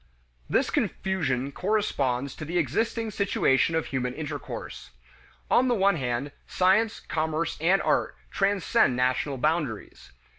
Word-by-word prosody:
This - - +1
confusion 140 -9 -1
corresponds 140 - -1
to - - -6
the 170 +3 -2
existing 220 - 0
situation 165 -6 +2
of 160 - 0
human 125 -2 -3
intercourse. 150 -2 -6 0.6
On 255 - +4
the 245 - +2
one 200 -3 +3
hand, 130 +1 -2 0.2
science, 200 +5 +2
commerce, 160 +1 -2
and 185 +4 +3
art - - +1 0.2
transcend 195 - +2
national 130 +2 0
boundaries. 150 -5 -2
160 Hz, 120 wpm, -26 LUFS, 135-195 Hz, 0.6 s, On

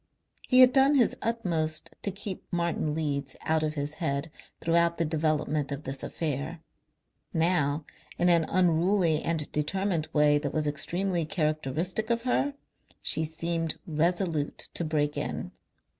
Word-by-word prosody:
He 255 -1 +6
had 255 0 +7
done 275 +2 +5
his 245 -5 +3
utmost 170 -9 -1
to - - 0
keep 195 0 -7
Martin 170 -3 -1
Leeds 140 -4 -2
out 160 0 +1
of 155 0 -1
his 145 0 -3
head 140 0 -1 0.3
throughout 170 0 +2
the 165 - +1
development 155 -2 0
of 140 +1 -4
this 135 -1 -5
affair. 155 +1 -3 0.8
Now 160 -3 +1 0.3
in 175 - +2
an 170 -2 +4
unruly 175 -1 +2
and 160 -3 -1
determined 165 +2 -1
way 150 -1 +4
that 145 -2 -4
was 155 -1 0
extremely 175 +4 0
characteristic 155 - -1
of 235 0 +1
her 275 +3 0 0.5
she 160 - +6
seemed 165 0 -2
resolute 165 -1 -1
to - - -1
break 150 -2 0
in. - - -3
160 Hz, 145 wpm, -28 LUFS, 150-180 Hz, 0.8 s, had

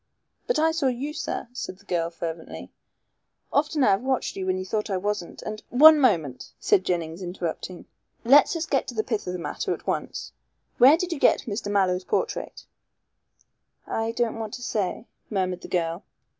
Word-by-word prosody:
"But - - +1
I 320 +1 +3
saw 320 -4 0
you, 260 +4 -2
sir," - - -4
said 220 -6 -5
the 200 - -22
girl 170 -3 0
fervently. 165 -1 -7 0.8
"Often 295 0 +2
I 210 - +5
have 195 - +2
watched 260 0 -1
you 190 -1 -4
when 185 0 +1
you 185 - -4
thought 210 +3 -2
I 190 - 0
wasn't, 205 -2 -3
and 215 0 -5
" - - -46 0.2
"One 315 -1 +10
moment," 160 - +1
said 190 - +3
Jennings, 170 -1 -2
interrupting. 175 0 -5 0.4
"Let's 280 +7 +6
us 330 -1 -1
get 275 -5 0
to 245 - -6
the 215 - +1
pith 220 -5 -3
of 180 - -2
the - - -3
matter 170 - -2
at - - -17
once. - - -3 0.5
Where 270 +6 +8
did 360 0 -3
you 290 - -6
get - - +4
Mr. 205 -3 -4
Mallow's 185 -2 +2
portrait?" 480 - -2 1.2
"I 225 0 -2
don't 230 -1 -1
want 220 -2 -4
to 245 - -9
say," 210 0 -2 0.2
murmured 185 -3 -1
the - - -8
girl. 170 +1 -1
210 Hz, 190 wpm, -25 LUFS, 180-255 Hz, 1.2 s, One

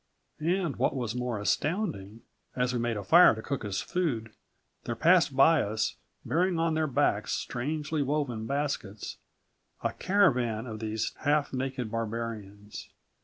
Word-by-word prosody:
"And, 170 -1 0
what 130 +2 +1
was 120 -4 -2
more 125 -2 -2
astounding, 110 - -2 0.3
as 125 0 0
we 120 - 0
made 120 -1 -1
a 100 - -4
fire 170 - +7
to 110 - -6
cook 140 -2 -3
us 100 -2 -2
food, 125 -12 -2 0.5
there 115 - -2
passed 165 +1 +4
by 160 +4 +6
us 110 +1 -1 0.3
bearing 180 +2 +1
on 165 0 +1
their 155 0 +1
backs 135 - +1
strangely 150 +4 -2
woven 135 -6 -1
baskets, 140 -7 -3 0.7
a - - 0
caravan 125 - +2
of 110 -3 -6
these 110 0 -2
half 145 -1 +1
naked 130 -3 -3
barbarians. 110 -3 -5
125 Hz, 145 wpm, -29 LUFS, 110-155 Hz, 0.7 s, fire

